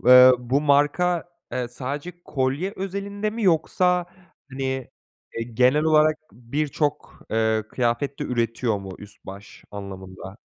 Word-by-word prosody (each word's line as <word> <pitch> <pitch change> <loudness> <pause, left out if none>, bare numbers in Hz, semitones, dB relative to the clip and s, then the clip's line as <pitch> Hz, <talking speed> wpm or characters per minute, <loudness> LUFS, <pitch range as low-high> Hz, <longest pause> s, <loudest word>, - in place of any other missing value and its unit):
eee, 125 0 +10
bu 125 +3 0
marka, 150 +5 +2 0.3
eee, 125 -1 -2
sadece 140 +7 -5
kolye 140 +8 -1
özelinde 200 +2 -3
mi 225 +1 -5
yoksa, 180 0 +2 0.4
hani, 130 -1 -3 0.5
eee, 115 - -1
genel 130 +6 +4
olarak 155 0 +4 0.2
birçok, 145 +5 -3
eee, 110 -1 +2
kıyafet 125 +3 -1
de - - -3
üretiyor 115 -2 0
mu 95 -1 -8
üst 105 0 -14
baş 100 +2 -11
anlamında? 95 -1 -8
130 Hz, 125 wpm, -24 LUFS, 115-155 Hz, 0.5 s, eee